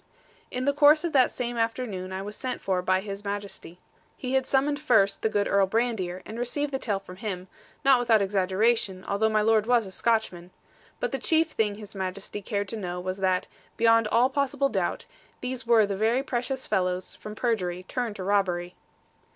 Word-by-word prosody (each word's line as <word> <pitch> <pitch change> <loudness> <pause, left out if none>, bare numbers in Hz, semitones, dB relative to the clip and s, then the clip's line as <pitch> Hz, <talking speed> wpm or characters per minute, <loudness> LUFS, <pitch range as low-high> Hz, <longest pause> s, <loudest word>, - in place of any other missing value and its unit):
In 255 +1 -3
the 280 - +3
course 295 +2 +6
of 340 - -2
that 260 -3 +5
same 240 -1 -4
afternoon 225 -5 -2
I 190 +1 -4
was 210 +1 -6
sent 255 -1 -4
for 185 -2 0
by 185 +1 +1
His 200 0 -6
Majesty. 200 -4 -6 0.4
He 255 0 -4
had 265 0 +2
summoned 285 +2 +1
first 200 -9 +3
the 220 - +1
good 205 -1 0
Earl 200 -1 +3
Brandir, 195 -5 -1
and 225 - -7
received 285 +4 -1
the 265 - -2
tale 210 -6 -1
from 185 -2 -12
him, 190 -3 -5 0.4
not 270 -2 +6
without 235 -3 +4
exaggeration, 195 0 +1
although 205 +2 +1
my 215 -1 +2
lord 220 0 +3
was 240 -3 +3
a 190 - -8
Scotchman. 190 -5 -1 0.5
But - - -1
the 270 - -2
chief 320 +4 +2
thing 210 -2 0
His 210 -1 -10
Majesty 190 +1 -4
cared 200 0 -3
to 225 - -3
know 180 -3 -4
was 185 +1 -4
that, 185 -1 +1 0.3
beyond 230 -1 +4
all 245 +5 +3
possible 280 0 +1
doubt, - - -2 0.3
these 250 -2 -5
were 230 -2 +6
the 200 -1 -3
very 225 +6 +1
precious 260 +1 -3
fellows 185 -2 -1
from 210 0 -9
perjury 185 -6 -1
turned 235 +2 -3
to 190 - -6
robbery. 185 -3 0
215 Hz, 195 wpm, -27 LUFS, 190-245 Hz, 0.5 s, course